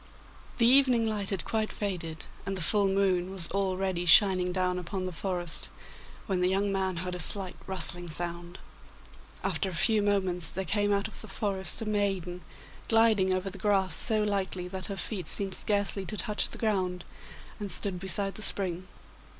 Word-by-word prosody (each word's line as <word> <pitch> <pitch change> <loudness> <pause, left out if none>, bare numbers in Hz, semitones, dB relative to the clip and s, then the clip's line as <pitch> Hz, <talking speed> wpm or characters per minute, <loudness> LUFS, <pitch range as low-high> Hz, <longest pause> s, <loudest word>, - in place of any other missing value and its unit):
The 230 - +4
evening 250 -2 +5
light 210 -3 0
had 195 -3 -1
quite 220 -1 -1
faded, 165 -6 -4 0.2
and 195 0 -3
the 180 - -2
full 200 +4 +3
moon 190 -2 +1
was 190 -3 +1
already 190 -2 -1
shining 185 0 +6
down 180 0 0
upon 185 +1 -4
the 185 - -4
forest, 175 -1 -3 0.6
when 190 -3 -1
the 180 - +3
young 195 +1 0
man 190 -1 -1
heard 180 - -4
a 180 - -5
slight 185 +2 -2
rustling 175 -2 -2
sound. 170 +2 -3 0.9
After 195 - -1
a 180 - -6
few 220 +5 +3
moments 190 -5 +1
there 190 +1 -3
came 205 +3 0
out 200 0 +1
of 220 - -11
the 220 - -9
forest 195 0 -1
a - - -6
maiden, 195 -4 -1 0.5
gliding 225 -4 +4
over 185 +1 -1
the 195 - -8
grass 190 -4 +2
so 215 -1 +1
lightly 190 -3 -1
that 190 0 -5
her 200 -2 -5
feet 185 -3 -4
seemed 195 -2 +4
scarcely 200 -1 -1
to 215 - -4
touch 210 -1 -1
the - - -7
ground, 185 -5 -1 0.5
and 205 -2 -5
stood 190 -3 +1
beside 195 +1 0
the - - -8
spring. 185 -3 +2
190 Hz, 180 wpm, -29 LUFS, 180-205 Hz, 0.9 s, shining